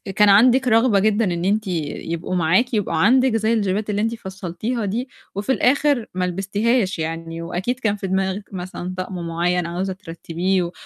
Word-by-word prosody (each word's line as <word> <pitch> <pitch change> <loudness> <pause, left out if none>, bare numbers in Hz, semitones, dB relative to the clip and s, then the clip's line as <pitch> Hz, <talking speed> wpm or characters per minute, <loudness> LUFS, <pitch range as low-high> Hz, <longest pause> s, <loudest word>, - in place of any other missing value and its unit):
كان 210 -1 +5
عندِك 250 +6 +5
رغبة 225 -2 +4
جدًا 215 +2 +2
إن 170 +1 -3
أنتِ 210 +1 +1
يبقوا 165 +1 -3
معاكِ، 185 +9 +2
يبقوا 205 -5 0
عندِك 250 +7 +4
زي 225 +1 +1
الجيبات 205 0 0
اللي 205 0 0
أنتِ 225 +1 0
فصّلتيها 195 +3 -4
دي، 235 +6 -3 0.3
وفي 205 +6 -1
الآخر 275 -1 +2
ما 180 0 0
لبستيهاش 195 +3 0
يعني، 165 +1 -4
وأكيد 185 +9 -3
كان 215 -3 0
في 195 - -5
دماغِك 190 +1 -1
مثلًا 180 0 -5
طقم 185 -2 -4
معيّن 175 +1 0
عاوزة 185 +3 -3
ترتّبيه 175 0 -2
195 Hz, 165 wpm, -21 LUFS, 180-225 Hz, 0.3 s, كان